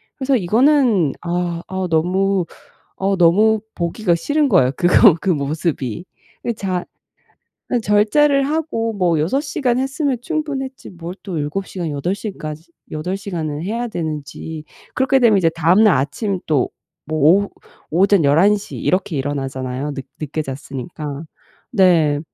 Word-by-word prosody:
그래서 270 -1 +1
이거는 225 - +3
아 175 -1 -2
아 190 -1 -3
너무 185 +3 +1 0.5
아 195 0 0
너무 210 +6 +4
보기가 175 +2 0
싫은 290 - +1
거예요. 150 - +4
그거 180 +2 +6
그 195 - 0
모습이. 145 - -2 0.4
이 235 - +1
자 185 -3 -3 0.9
아 245 - +1
절제를 270 +8 +3
하고 280 -7 -1
뭐 175 -5 +1
6 190 - +1
시간 265 -4 -1
했으면 270 +1 0
충분했지 275 -4 -4
뭘 175 0 -8
또 185 -5 -5
7 150 +6 -3
시간 175 -4 -4
8 150 +6 -2
시까지 170 -6 -7 0.2
8 180 +5 -3
시간을 160 -7 -4
해야 235 +4 -2
되는지. 155 -2 -5 0.3
그렇게 265 +1 +3
되면 225 -5 +5
이제 170 -3 +2
다음날 175 +5 +4
아침 185 - -1
또 145 -5 +1 0.4
뭐 155 0 -1
오후 190 +8 +4 0.4
오전 185 0 +3
11 180 +9 +4
시 200 - -9
이렇게 185 -2 0
일어나잖아요? 135 0 -3
늦 135 -2 -7
늦게 155 +1 -3
잤으니까. 140 +2 -6 0.5
네. 170 -8 +4
180 Hz, 260 characters per minute, -19 LUFS, 155-220 Hz, 0.9 s, 그거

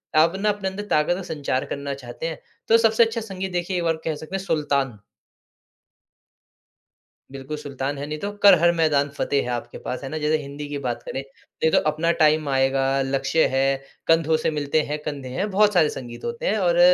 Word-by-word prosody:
आप 165 +4 +5
ना 210 +1 +2
अपने 205 -2 -1
अंदर 200 +2 -6
ताकत 150 +3 +2
और 190 - -5
संचार 140 -6 -2
करना 140 0 -4
चाहते 125 +2 -8
हैं, 160 - -5 0.3
तो 230 - +6
सबसे 225 0 +4
अच्छा 225 0 -3
संगीत 190 -3 -5
देखिए 180 +1 -1
एक 175 - -1
बार 165 -1 +1
कह 160 -2 -1
सकते 155 +5 -7
हैं 195 - -3
सुल्तान। 140 - 0 2.3
बिल्कुल 135 +2 -6
सुल्तान 140 0 -4
है, 140 - -4
नहीं 155 0 -4
तो 205 +1 -3
कर 195 -3 +9
हर 170 0 +5
मैदान 145 -3 +2
फतेह 140 - +1
है 125 - -5
आपके 120 0 -7
पास, 130 +2 -5
है - - -4
ना 155 - -4
जैसे 150 +1 +2
हिंदी 145 +1 -7
की 145 - -3
बात 120 -1 -2
करें। 135 - -4
नहीं 140 +3 -4
तो - - +4
अपना 165 +3 +1
टाइम 155 0 +4
आएगा, 135 0 +2
लक्ष्य 135 +4 +1
है, 135 - +3 0.4
कंधों 165 -1 +4
से - - +3
मिलते 150 +1 0
हैं 150 - -1
कंधे 140 -4 -5
हैं। 205 +3 -1
बहुत 210 +1 +4
सारे 160 -4 +4
संगीत 120 -2 -10
होते 235 0 -4
हैं 215 - +2
और 175 -2 +2
155 Hz, 210 wpm, -23 LUFS, 140-180 Hz, 2.3 s, कर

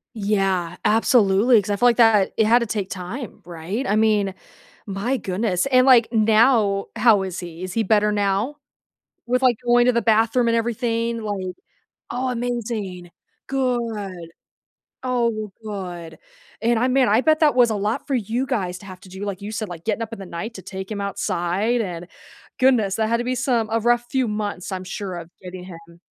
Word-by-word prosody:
Yeah, 195 -4 0
absolutely, 225 0 +4
'cause 200 - -9
I 205 - +1
feel 245 +4 +4
like 235 - +4
that, 225 -5 +4
it 220 - +3
had 235 +3 +5
to 235 - -1
take 205 -3 -3
time, 210 +5 -7
right? 175 +9 -4
I 205 - +1
mean, 210 -3 +2 0.5
my 205 +6 -2
goodness, 190 -1 -1
and, 255 -1 +4
like, 245 -4 +6
now, 220 -2 +3
how 220 -3 +5
is 185 -1 -5
he? 175 0 -8
Is 185 0 -5
he 225 - +1
better 210 +1 +3
now 205 +7 0 0.7
with, 250 +2 0
like, 250 -3 +3
going 240 0 +4
to - - +6
the 235 -1 +1
bathroom 225 +2 +2
and 230 - +2
everything, 230 0 -1
like 195 -4 -4 0.5
Oh, 255 +2 -2
amazing. 225 -7 -4 0.4
Good. 225 -10 -2 0.7
Oh, 235 -4 -1
good, 180 -5 -7 0.4
and 235 0 +2
I 250 +3 +1
man, 260 0 +3
I 215 +4 +4
bet 310 +2 +2
that 300 -4 +4
was 240 -2 +5
a 215 - 0
lot 210 +2 -2
for 280 - -1
you 235 +2 -1
guys 185 -9 -2
to 195 - -14
have 185 -2 -10
to 195 - -15
do, 190 +2 -7
like 200 -1 -5
you 210 +2 -6
said, 215 -2 -4
like, 170 -2 -9
getting 225 +1 -1
up 230 0 -6
in 225 - -6
the 195 - -7
night 215 +7 -6
to 190 - -9
take 190 +1 -7
him 205 - -4
outside 200 +3 -1
and 175 -3 -6 0.5
goodness, 240 -7 +3
that 220 -1 0
had 235 +1 +1
to 240 - -2
be 255 +1 -1
some 240 -4 0
a 225 - +1
rough 240 +1 +2
few 260 -2 +1
months, 205 -3 -4
I'm 185 0 -4
sure, 185 -1 -5
of 170 -1 -9
getting 180 0 -8
him 170 -1 -13
215 Hz, 195 wpm, -22 LUFS, 190-240 Hz, 0.7 s, like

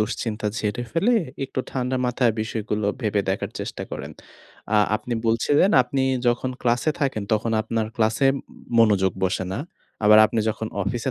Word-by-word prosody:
দুশ্চিন্তা 105 0 -2
ঝেড়ে 110 +3 -2
ফেলে 195 +10 +2 0.3
একটু 130 - -3
ঠান্ডা 130 0 -1
মাথায় 125 -1 +2
বিষয়গুলো 110 -1 -2
ভেবে 105 -3 +1
দেখার 95 - -2
চেষ্টা - - -5
করেন। - - -6 0.6
আ - - +5 0.2
আপনি 120 +2 -5
বলছিলেন 145 - +3
আপনি 135 +2 -2 0.2
যখন 120 +2 +1
ক্লাসে 120 +5 +2
থাকেন, 135 -7 0
তখন 110 +1 +1
আপনার 110 0 -2
ক্লাসে 115 +4 +2
ম - - -5 0.4
মনোযোগ 100 -4 +4
বসে 95 0 0
না। - - -3 0.4
আবার 105 +1 +8
আপনি 110 - -1
যখন 110 0 -3
অফিসে 115 +6 -2
115 Hz, 155 wpm, -23 LUFS, 105-125 Hz, 0.6 s, আবার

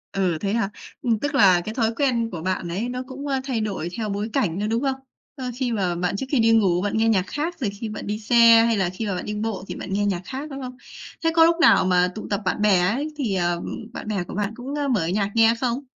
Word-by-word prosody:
Ừ, 180 -4 +1
thế 200 0 -1
hả? 230 -4 0 0.3
Ừm, 230 -3 +1
tức 290 +2 -2
là 185 -8 +6
cái 215 - -4
thói 225 -2 +1
quen 235 -5 +1
của 165 -3 -5
bạn 185 -1 -2
ấy 210 +8 -2
nó 250 +1 -4
cũng, 280 +2 -7
à, 270 -1 0
thay 255 -5 -2
đổi 195 -5 -3
theo 215 -2 -2
bối 205 +3 -3
cảnh 195 -9 0
nữa, 210 - -1
đúng 230 +3 0
không? 270 -1 +1 0.4
Ờ, 255 -3 -4
khi 250 -2 -1
mà 185 -5 0
bạn 180 +2 -1
trước 265 - -3
khi 275 - +3
đi 225 0 +4
ngủ 190 -6 +3
bạn 205 +2 -1
nghe 225 0 +3
nhạc 190 -3 +2
khác, 320 +4 -3
rồi 225 -6 -1
khi 210 +3 -6
bạn 210 - -7
đi 210 +1 -2
xe 230 0 +6
hay 230 -2 +2
là 190 -2 +1
khi 205 +4 -5
mà 195 - -1
bạn - - -5
đi 210 - -4
bộ 210 -3 -3
thì - - -5
bạn 190 - -6
nghe 205 +1 +1
nhạc 185 -3 -1
khác, 275 +3 -6
đúng 275 0 -7
không? 255 -1 -7 0.5
Thế 325 - +3
có 325 0 +7
lúc 335 0 +4
nào 190 - +6
mà 180 0 +3
tụ 215 - -6
tập 200 0 -1
bạn 185 - -1
bè 205 -4 +4
ấy 265 +12 0
thì, 225 -9 -1
à, 175 -1 +1 0.4
bạn - - -7
bè 200 -4 -1
của - - -9
bạn 210 +1 -2
cũng, 265 +4 -6
a, 285 - 0
mở 210 -11 +1
nhạc 200 +2 0
nghe 225 0 +5
không? 255 +2 -1
220 Hz, 285 wpm, -23 LUFS, 195-250 Hz, 0.5 s, có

